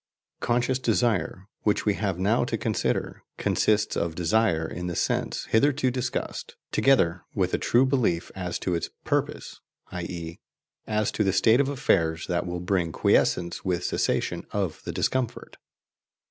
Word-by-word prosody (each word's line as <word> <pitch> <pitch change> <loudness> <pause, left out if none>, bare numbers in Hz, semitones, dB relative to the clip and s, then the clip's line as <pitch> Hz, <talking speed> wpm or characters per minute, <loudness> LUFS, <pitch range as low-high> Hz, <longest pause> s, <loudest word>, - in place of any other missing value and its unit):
"Conscious" 125 +2 +1
desire, 110 -6 0
which 105 - +1
we 105 - +3
have 100 -3 -2
now 100 +5 +2
to - - -2
consider, - - -1 0.2
consists 105 0 +1
of 85 -2 -1
desire 90 -2 +2
in 90 +2 -5
the 85 - -3
sense - - -1
hitherto 130 +2 +2
discussed, 125 -1 -4 0.2
together 90 -11 +3
with - - 0
a - - +1
true 125 +3 +3
belief 125 -11 0
as 90 -2 -3
to 90 - -2
its 85 - -2 0.2
"purpose," - - -2 0.3
i.e. 85 -2 -6 0.5
as 110 -1 0
to 105 - 0
the 95 - +2
state 110 +6 +4
of 140 -1 +2
affairs 85 - +1
that 90 0 -1
will 90 0 -4
bring 90 -2 0
quiescence 85 +1 +1
with 90 -2 -1
cessation - - -1
of - - -2
the - - -3
discomfort. 130 -3 -2
95 Hz, 150 wpm, -26 LUFS, 85-120 Hz, 0.5 s, state